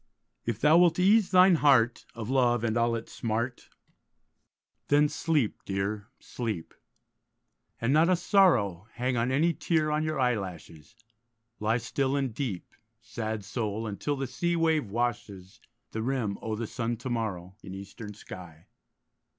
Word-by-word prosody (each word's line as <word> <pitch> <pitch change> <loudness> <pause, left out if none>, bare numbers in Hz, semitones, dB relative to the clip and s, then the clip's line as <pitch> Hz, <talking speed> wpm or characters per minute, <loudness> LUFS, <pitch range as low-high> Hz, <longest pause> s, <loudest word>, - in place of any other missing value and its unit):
If 115 -2 -1
thou 155 +5 +6
wilt 175 -2 +4
ease 200 +3 +4
thine 185 -1 +6
heart 130 -6 +3
Of 115 -2 -5
love 120 -3 +2
and 115 -1 0
all 115 0 +2
its 115 - -7
smart, 115 +2 -3 1.2
Then 145 +1 +4
sleep, 150 -6 -1
dear, 100 +2 -3
sleep; 110 -9 -5 1.1
And 115 +4 +1
not 160 +3 +5
a 185 - +5
sorrow 125 - +3
Hang 125 +1 -1
any 130 +8 +2
tear 155 -3 0
on 150 +1 +1
your 155 -2 -2
eyelashes; 95 -7 -3 0.6
Lie 110 +2 +1
still 130 +3 -1
and 135 -4 -1
deep, 110 -8 -4 0.3
Sad 110 -2 -5
soul, 110 0 -3
until 110 +7 -2
the 135 0 -3
sea 170 +7 -1
wave 160 -7 +1
washes 105 -3 -3 0.3
The 110 - -3
rim 115 -5 -1
o' 110 -1 -3
the 115 +2 -3
sun 115 +1 -3
to 120 +3 -6
morrow, 95 -6 -3
In 95 - -8
eastern 100 +2 -9
sky. 90 -6 -11
120 Hz, 145 wpm, -28 LUFS, 105-145 Hz, 1.2 s, thou